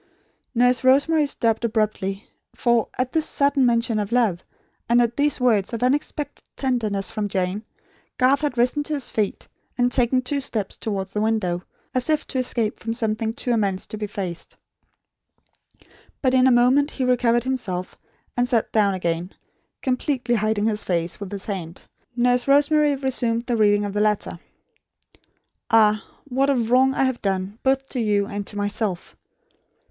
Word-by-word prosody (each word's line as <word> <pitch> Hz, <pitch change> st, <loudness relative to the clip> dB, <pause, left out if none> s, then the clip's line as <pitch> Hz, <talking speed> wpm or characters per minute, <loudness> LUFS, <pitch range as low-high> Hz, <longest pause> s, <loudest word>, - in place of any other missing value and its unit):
Nurse 245 Hz, +2 st, +3 dB
Rosemary 285 Hz, +4 st, +4 dB
stopped 230 Hz, -4 st, 0 dB
abruptly; 215 Hz, -3 st, -1 dB, 0.3 s
for, 235 Hz, -3 st, +1 dB
at 255 Hz, 0 st, -1 dB
this 320 Hz, -1 st, +1 dB
sudden 280 Hz, -2 st, +2 dB
mention 230 Hz, -2 st, +1 dB
of 205 Hz, +1 st, -3 dB
love, 225 Hz, -8 st, +1 dB, 0.5 s
and 240 Hz, +1 st, +5 dB
at 235 Hz, -1 st, +1 dB
these 290 Hz, 0 st, +1 dB
words 230 Hz, -5 st, +2 dB
of 230 Hz, -, -2 dB
unexpected 290 Hz, +2 st, -1 dB
tenderness 215 Hz, -8 st, 0 dB
from 215 Hz, -2 st, -2 dB
Jane, 190 Hz, +2 st, -2 dB, 0.5 s
Garth 265 Hz, +3 st, +3 dB
had 290 Hz, -5 st, -2 dB
risen 250 Hz, +5 st, +2 dB
to 300 Hz, +1 st, -2 dB
his 280 Hz, -, -3 dB
feet, 210 Hz, -2 st, -2 dB, 0.3 s
and 245 Hz, 0 st, +2 dB
taken 255 Hz, +1 st, +2 dB
two 280 Hz, +2 st, -1 dB
steps 215 Hz, -7 st, -3 dB
towards 195 Hz, -3 st, -4 dB
the 210 Hz, -, -1 dB
window; 210 Hz, -6 st, 0 dB, 0.3 s
as 255 Hz, +3 st, -1 dB
if 310 Hz, -1 st, +1 dB
to 260 Hz, -, -1 dB
escape 235 Hz, -3 st, -1 dB
from 225 Hz, +1 st, -3 dB
something 220 Hz, -1 st, -1 dB
too 245 Hz, +2 st, -3 dB
immense 200 Hz, -5 st, 0 dB
to -, -, -7 dB
be 210 Hz, 0 st, -3 dB
faced. 185 Hz, -4 st, -6 dB, 1.6 s
But, 260 Hz, -2 st, +1 dB
in 260 Hz, 0 st, +5 dB
a -, -, +5 dB
moment 255 Hz, +4 st, +4 dB
he 265 Hz, -, -4 dB
recovered 240 Hz, -2 st, +2 dB
himself, 205 Hz, -9 st, -3 dB, 0.4 s
and 245 Hz, 0 st, +1 dB
sat 235 Hz, -3 st, 0 dB
down 205 Hz, -3 st, +2 dB
again, 170 Hz, 0 st, -2 dB, 0.5 s
completely 255 Hz, -1 st, 0 dB
hiding 215 Hz, -1 st, +1 dB
his 215 Hz, -1 st, +1 dB
face 170 Hz, -1 st, -1 dB
with 200 Hz, -2 st, -7 dB
his 200 Hz, -1 st, -6 dB
hand. 180 Hz, -4 st, -6 dB, 0.3 s
Nurse 245 Hz, +1 st, +2 dB
Rosemary 290 Hz, +1 st, +4 dB
resumed 245 Hz, -4 st, 0 dB
the 240 Hz, -, 0 dB
reading 205 Hz, -2 st, +3 dB
of 200 Hz, -, -4 dB
the 210 Hz, -, 0 dB
letter. 210 Hz, -1 st, 0 dB, 1.3 s
"Ah, 215 Hz, -2 st, +4 dB, 0.2 s
what 270 Hz, 0 st, 0 dB
a 280 Hz, -, +3 dB
wrong 250 Hz, +3 st, +3 dB
I -, -, +2 dB
have 260 Hz, -2 st, -1 dB
done, 195 Hz, +2 st, -2 dB
both 270 Hz, 0 st, +1 dB
to 255 Hz, -, -4 dB
you, 205 Hz, -3 st, +1 dB
and 205 Hz, -1 st, -5 dB
to 205 Hz, -, -7 dB
myself! 205 Hz, -2 st, -3 dB
235 Hz, 165 wpm, -23 LUFS, 205-255 Hz, 1.6 s, and